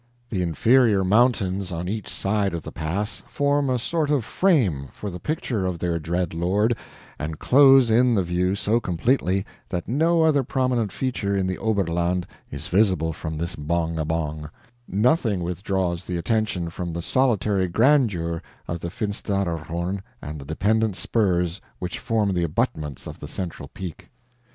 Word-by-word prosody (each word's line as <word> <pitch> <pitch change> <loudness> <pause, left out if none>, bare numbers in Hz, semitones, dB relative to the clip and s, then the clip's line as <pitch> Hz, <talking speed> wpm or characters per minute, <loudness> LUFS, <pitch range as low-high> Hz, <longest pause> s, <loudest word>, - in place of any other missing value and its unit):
The 95 -5 0
inferior 105 +4 +4
mountains 100 -3 +2
on 85 +1 -3
each 105 +2 -4
side 100 -2 0
of 85 - -5
the - - -7
pass 100 +8 -3
form 145 -1 +1
a 130 - +2
sort 150 +5 -1
of 140 -7 +1
frame 105 - +2
for 105 - -6
the 90 - -7
picture 120 -10 -2
of 90 -2 -2
their 85 0 -1
dread 85 +2 -2
lord, 100 +8 +1 0.4
and 75 +1 -4
close 135 - +6
in 120 +1 +4
the 95 - +2
view 90 +2 0
so 110 +3 +1
completely 95 0 +1 0.2
that 90 -2 -3
no 160 - +3
other 155 -3 +4
prominent 125 -5 0
feature 110 -6 -1
in 95 - +1
the 95 0 -2
Oberland 90 -4 0 0.2
is 70 +1 -6
visible 90 -5 +2
from 80 0 -5
this 85 +3 -3
BONG 80 +2 -1
A - - +1
BONG; 75 -1 -3 0.4
nothing 110 - +2
withdraws 90 0 -1
the 90 - -2
attention 95 -3 -1
from 85 0 -4
the 85 0 -4
solitary 105 -7 +2
grandeur 100 - +2 0.3
of 85 - -3
the 85 - -4
Finsteraarhorn 95 -3 -2 0.2
and 75 +3 -7
the 70 - -9
dependent 105 +7 +1
spurs 90 -2 0 0.2
which 90 -1 -4
form 110 -4 +1
the 90 - 0
abutments 75 -3 -2
of - - -8
the - - -7
central 85 -6 -5
peak. 90 -4 -8
95 Hz, 160 wpm, -24 LUFS, 85-115 Hz, 0.4 s, close